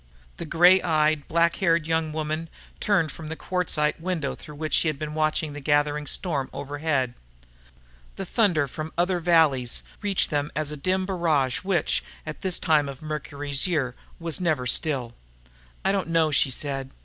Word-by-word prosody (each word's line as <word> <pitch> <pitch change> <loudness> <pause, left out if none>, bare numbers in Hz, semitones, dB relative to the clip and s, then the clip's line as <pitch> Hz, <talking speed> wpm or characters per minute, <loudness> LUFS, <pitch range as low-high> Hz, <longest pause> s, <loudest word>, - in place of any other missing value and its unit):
The - - -5
grey 175 +4 +6
eyed, 155 -2 +2
black 170 +1 +2
haired 170 -4 +2
young 160 -1 0
woman 155 +1 -3 0.3
turned 180 -7 +2
from 160 +1 -9
the 160 - -4
quartzite 165 -4 0
window 170 -5 -2
through 150 - -11
which 155 -1 -4
she - - +4
had 155 -2 0
been 150 0 -5
watching 155 -1 0
the 145 - -6
gathering 145 +1 +1
storm 150 -8 -1
overhead. 140 -2 -1 1.0
The 195 - -5
thunder 180 - +2
from 155 +4 -6
other 175 +1 +2
valleys 160 -8 +3 0.2
reached 200 -4 +1
them 145 0 0
as 150 0 -1
a - - -4
dim 185 +6 0
barrage 160 -9 +1
which, 180 -3 0 0.2
at 155 -1 -7
this 185 -2 0
time 150 -4 +2
of 135 +2 -9
Mercury's 145 -1 -2
year, 145 -8 0 0.3
was 165 0 -3
never 155 -8 +1
still. 125 -2 0 0.7
"I 195 - +4
don't 195 -3 0
know," 165 -2 +3
she 135 -1 +3
said. 135 0 -3
155 Hz, 170 wpm, -25 LUFS, 145-170 Hz, 1.0 s, grey